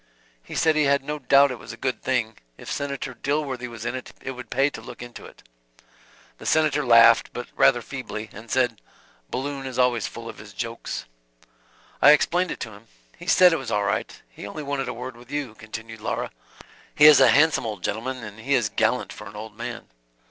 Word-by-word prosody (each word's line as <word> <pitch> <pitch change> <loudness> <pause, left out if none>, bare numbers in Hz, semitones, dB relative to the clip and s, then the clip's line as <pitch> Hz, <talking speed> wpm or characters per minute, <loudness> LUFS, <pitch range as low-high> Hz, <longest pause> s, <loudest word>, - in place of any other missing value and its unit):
"He - - -10
said 160 -1 +3
he 155 -1 +3
had 140 0 +2
no 150 +2 -4
doubt 140 0 +5
it 125 - -6
was 110 - -9
a - - -10
good 130 -1 -2
thing; 120 -4 -1 0.2
if - - -8
Senator 140 -2 -3
Dilworthy 135 -1 -2
was 115 -2 -9
in 120 - -1
it, 130 -1 -7
it 135 - -5
would 125 -3 -9
pay 135 +2 +2
to - - -8
look - - -10
into 120 -1 -10
it." - - -18 1.0
The - - -7
Senator 155 -2 +3
laughed, 115 -2 +6
but 120 - -6
rather 120 -3 +4
feebly, 120 -5 -6
and 110 +3 -11
said, 125 -4 +1 0.5
"Balloon 135 +1 -4
is 130 - -6
always 125 -3 +2
full 115 0 -9
of 115 - -9
his 105 -1 -12
jokes." 115 +1 -5 1.0
"I 145 +3 +9
explained 175 +4 +2
it - - -5
to 110 - -5
him. 105 +2 -15 0.3
He - - -10
said 180 -2 +6
it - - +2
was 135 -4 -6
all 105 -2 +1
right, 100 -1 -2
he - - -10
only 150 +9 -6
wanted 140 -1 -2
a - - -3
word 125 +1 -7
with 120 +1 -16
you,", 145 -5 -3
continued 110 0 -9
Laura. - - -3 0.6
"He 150 - +6
is 150 -2 +10
a - - +7
handsome 150 -3 +4
old 105 -5 -6
gentleman, 125 +4 -3
and 105 0 -9
he 135 +5 +1
is 120 -5 +1
gallant 110 +4 0
for 105 - -10
an 105 - -11
old 105 0 -8
man." 120 +1 -6
125 Hz, 215 wpm, -24 LUFS, 115-140 Hz, 1.0 s, is